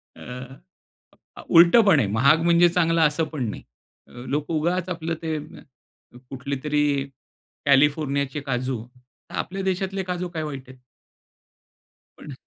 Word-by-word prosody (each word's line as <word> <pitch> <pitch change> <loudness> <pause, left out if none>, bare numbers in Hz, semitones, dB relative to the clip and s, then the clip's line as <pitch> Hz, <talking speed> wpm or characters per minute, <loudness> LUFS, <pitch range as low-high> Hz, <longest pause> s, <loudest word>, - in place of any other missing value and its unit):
अ, - - -15 1.3
उलटं 170 +7 +7
पण 165 -8 +5
आहे. 110 - +1
महाग 140 +9 +3
म्हणजे 170 0 +5
चांगलं 165 -1 +2
असं 155 +1 +2
पण 125 -7 -2
नाही. - - -7 0.4
अ, - - -21 0.2
लोकं 150 +4 -2
उगाच 170 +3 -1
आपलं 165 -2 -3
ते 160 -1 -2 0.9
कुठलेतरी 140 +1 -1 0.6
कॅलिफोर्नियाचे 140 0 +2
काजू. 130 -2 -2 0.5
तर - - -8
आपल्या 195 +1 -4
देशातले 190 +1 -2
काजू 180 0 -3
काय 160 -3 -4
वाईट 135 -4 -7
आहेत? 130 - -13 1.4
पण 145 - -9
155 Hz, 125 wpm, -23 LUFS, 140-170 Hz, 1.4 s, उलटं